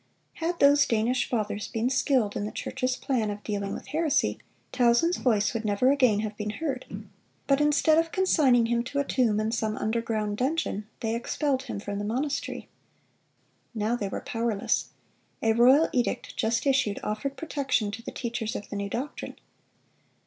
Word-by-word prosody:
Had 340 +1 -2
those 285 0 +6
Danish 235 +3 +1
fathers 210 -3 -2
been 230 +1 -1
skilled 255 -6 +1
in - - -2
the 210 - -4
church's 255 0 -2
plan 240 -6 -1
of 205 0 -6
dealing 200 -2 -3
with - - -7
heresy, 310 0 +1 0.3
Tausen's 245 +8 +3
voice 215 -4 +1
would 230 -1 -3
never 215 +5 +3
again 250 -7 +3
have 215 -1 -4
been 210 0 -4
heard; 265 +2 -4 0.6
but 275 +1 +3
instead 295 +2 +4
of 330 0 -1
consigning 290 -11 +3
him 235 0 +1
to 280 +2 -5
a 280 - +3
tomb 235 -6 +1
in 215 +1 0
some 220 -2 -1
underground 220 -2 -1
dungeon, 255 -6 -1
they 225 -1 -1
expelled 260 +3 -1
him - - -5
from 205 0 -4
the - - -3
monastery. 260 +7 -2 1.1
Now 220 +2 0
they 205 -4 -3
were - - -4
powerless. 225 -3 -1 0.5
A 225 0 +4
royal 260 +7 +6
edict, 245 -2 -1
just 230 +3 0
issued, 265 -7 +2
offered 215 +7 -3
protection 270 -9 -1
to 220 +3 -7
the - - -7
teachers 230 -2 -3
of 205 - -6
the - - -5
new 200 0 -3
doctrine. 265 +8 -5
235 Hz, 170 wpm, -27 LUFS, 215-275 Hz, 1.1 s, those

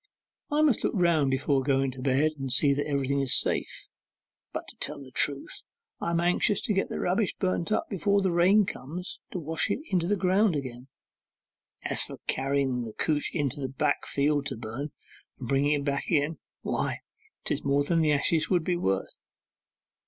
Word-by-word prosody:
'I 300 0 +2
must 285 -8 +3
look - - 0
round 170 -6 +3
before 135 +1 +1
going 135 0 +1
to 130 0 -9
bed 140 +4 +2
and 135 -1 -3
see 140 +2 +4
that 145 +2 -2
everything's 140 -2 +1
safe; - - -2 0.6
but - - -5
to - - -12
tell - - -4
the 135 -2 -12
truth 140 +1 0 0.4
I - - -2
am 170 0 +1
anxious 180 +4 +2
to 210 - 0
get 195 - 0
the - - -4
rubbish 190 +3 0
burnt 185 0 -1
up - - +1
before 200 0 +1
the 190 - +2
rain 190 +5 +5
comes 175 +5 -7
to - - -4
wash 160 -1 -1
it - - +1
into 185 +2 +2
ground 190 0 +2
again. 130 -2 -5 1.0
As - - +3
to - - -8
carrying 135 -2 0
the 110 - -8
couch 150 +3 0
into 145 -3 -2
the 135 -2 -3
back 135 - -1
field 145 0 +1
to 135 - -4
burn, 120 +6 -5 0.5
and 125 - -7
bringing 140 +3 +2
it 145 -1 -1
back 140 -1 -1
again, 155 -1 +1 0.2
why, - - -2 0.4
'tis - - 0
more 140 +1 +2
than 165 +3 +1
the 155 -1 +3
ashes 155 +2 +1
would 180 -3 +2
be 175 +1 0
worth. 95 - -2
145 Hz, 185 wpm, -28 LUFS, 135-175 Hz, 1.0 s, rain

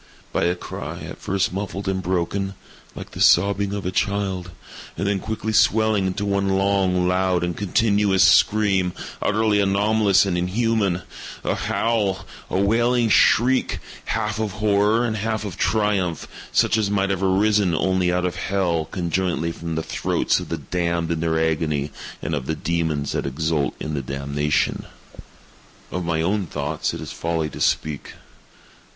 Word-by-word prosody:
—by - - +1
a 90 +1 +1
cry, - - -7
at - - -8
first 95 +1 -1
muffled 100 0 -4
and 95 -1 0
broken, 95 +2 -1 0.4
like - - -8
the - - -6
sobbing 100 +2 +4
of 100 -2 -4
a 90 - -1
child, 95 -2 -1 0.5
and - - -2
then 100 -1 +1
quickly 110 +2 -3
swelling 110 -2 +3
into 95 +2 -2
one 100 -1 0
long, 95 -2 +2
loud, 90 -1 +1
and 85 -1 -2
continuous 100 -1 +2
scream, 100 -4 +4 0.3
utterly 105 0 +2
anomalous 100 0 +3
and 90 -3 0
inhuman—a 100 -2 -1
howl—a 100 -5 -2
wailing 115 +4 +2
shriek, 125 +5 +3 0.3
half 105 -1 -2
of 110 -3 -2
horror 105 +2 +2
and 110 -2 -1
half 110 +1 -2
of 100 - -5
triumph, 100 -6 0 0.2
such 110 - +3
as 105 -2 0
might 100 -1 +1
have 95 -1 -1
arisen 100 -1 +2
only 95 +1 +1
out 90 0 0
of 90 - -2
hell, 90 -5 0
conjointly 85 -1 -1
from 85 0 -5
the 80 - -2
throats - - 0
of - - -8
the - - -2
damned 85 -2 -2
in 85 - -1
their 80 0 0
agony 75 -3 0 0.3
and - - -2
of 70 -3 -3
the 80 - -1
demons 80 -3 -1
that - - -2
exult 75 +1 -1
in 75 - -4
the 70 - -1
damnation. 70 +2 -1 1.1
Of 90 - -3
my 85 -1 0
own 95 +1 0
thoughts 75 +1 -2
it - - -7
is - - -6
folly 80 -2 -2
to - - -8
speak. 75 -3 -1
95 Hz, 160 wpm, -22 LUFS, 85-105 Hz, 1.1 s, sobbing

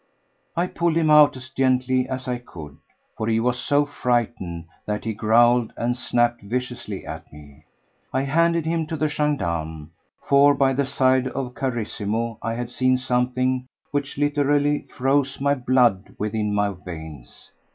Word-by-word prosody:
I 175 - +2
pulled 170 -2 0
him 160 -2 +3
out 150 -2 +6
as 130 0 -10
gently 130 -1 +1
as 130 0 -4
I 125 -1 -2
could, 80 -11 -11 0.4
for 110 - -3
he 115 0 +2
was 125 +1 0
so 145 +2 +2
frightened 120 - -2 0.2
that 105 +1 -3
he 110 - -1
growled 115 +2 +3
and 120 +1 0
snapped 120 -1 +1
viciously 120 -2 -4
at 80 +1 -8
me. 75 0 -15 0.5
I 130 +1 0
handed 165 +3 +2
him 165 -1 -1
to 160 0 -4
the 155 - +1
gendarme, 85 - -2 0.3
for 140 +1 +5
by 135 -1 +3
the 135 0 0
side 130 -1 +2
of 130 -1 -4
Carissimo 115 -3 -3
I 115 0 -2
had 120 0 -5
seen 130 0 +2
something 125 0 0 0.2
which 145 -2 -3
literally 145 0 +1
froze 135 +1 0
my 140 +1 +2
blood 125 -6 +2
within 105 0 -1
my 105 0 +1
veins. 80 -7 -10
125 Hz, 155 wpm, -23 LUFS, 110-140 Hz, 0.5 s, out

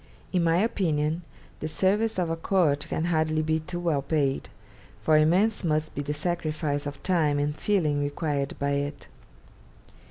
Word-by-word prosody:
In 180 -2 +2
my 165 0 +3
opinion, 165 -6 0 0.4
the 155 - -3
service 200 +7 +2
of 175 -3 0
a - - 0
court 165 -4 +1
can 160 - -1
hardly 155 -2 +1
be 160 +1 +1
too 175 +3 -6
well 165 -5 +1
paid, 140 -1 0 0.5
for 155 - +3
immense 180 +9 +3
must 155 -2 0
be 145 - -3
the 145 +1 -3
sacrifice 155 -2 -2
of 145 - -8
time 160 -6 +2
and 145 +1 0
feeling 155 -6 +1
required 145 -1 -2
by 140 0 -1
it. 140 +1 -2
155 Hz, 160 wpm, -27 LUFS, 145-175 Hz, 0.5 s, my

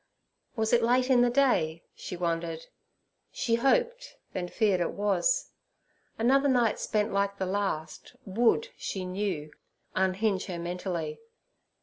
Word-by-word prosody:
Was 220 0 0
it 240 - +5
late 250 +3 +2
in 245 -2 +6
the 245 - +4
day? 240 - +2
she 180 - -7
wondered. 165 -1 -2 0.7
She 235 - -1
hoped, 480 - +1 0.2
then 180 -1 -3
feared 200 -2 +1
it 170 - -1
was; - - +1 0.7
another 270 +5 +3
night 240 -4 +2
spent 210 -1 0
like 200 0 0
the 190 - -1
last, 190 0 -3
would, 235 - +2
she 190 -2 -4
knew, 180 -5 -3 0.4
unhinge 190 +1 0
her 180 -3 -4
mentally. 170 -2 -4
200 Hz, 130 wpm, -28 LUFS, 180-245 Hz, 0.7 s, in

